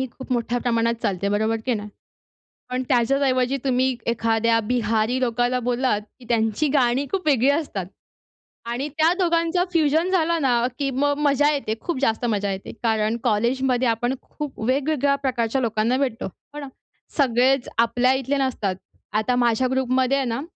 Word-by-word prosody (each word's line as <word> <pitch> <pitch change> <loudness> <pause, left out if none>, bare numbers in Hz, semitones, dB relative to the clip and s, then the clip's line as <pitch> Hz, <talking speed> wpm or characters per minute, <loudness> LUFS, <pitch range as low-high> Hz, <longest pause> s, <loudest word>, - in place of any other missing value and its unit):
ही 265 - -1
खूप 260 0 -7
मोठ्या 240 0 0
प्रमाणात 230 -1 +1
चालते, 200 0 -1
बरोबर, 220 +2 +1
की 250 - +2
नाही? 210 -1 -5 0.8
पण 255 +1 -2
त्याच्याच 260 +2 +2
ऐवजी 255 0 +1
तुम्ही 260 -1 +1
एखाद्या 230 0 +2
बिहारी 230 0 +1
लोकाला 245 +1 +1
बोललात, 245 -3 0 0.2
की 245 - -15
त्यांची 225 +5 +1
गाणी 265 -1 +2
खूप 380 -4 -2
वेगळी 270 -2 +4
असतात 285 - -1 0.8
आणि 250 +5 -2
त्या 320 +1 +4
दोघांच 335 -1 +1
फ्युजन 320 +2 +2
झालं 335 -2 +1
ना, 245 -3 +2
की 275 - 0
मग 285 +2 0
मजा 290 +1 +3
येते, 270 -6 -2
खूप 345 -5 -3
जास्त 225 -1 +1
मजा 205 -3 0
येते. 190 0 -6
कारण 220 0 +1
कॉलेजमध्ये 250 +3 +1
आपण 240 +3 0
खूप 295 -3 -8
वेगवेगळ्या 280 +2 +1
प्रकारच्या 260 -2 -1
लोकांना 230 +1 +1
भेटतो, 255 -5 -2
हो 290 +9 -11
ना? 285 - -6 0.5
सगळेच 260 -1 +2
आपल्या 245 +3 +3
इथले 265 +2 -1
नसतात. 240 -8 -1 0.4
आता 220 +4 +1
माझ्या 240 +1 +2
ग्रुपमध्ये 260 +1 +1
आहे 270 - 0
ना, 235 +3 -2
250 Hz, 160 wpm, -23 LUFS, 230-275 Hz, 0.8 s, वेगळी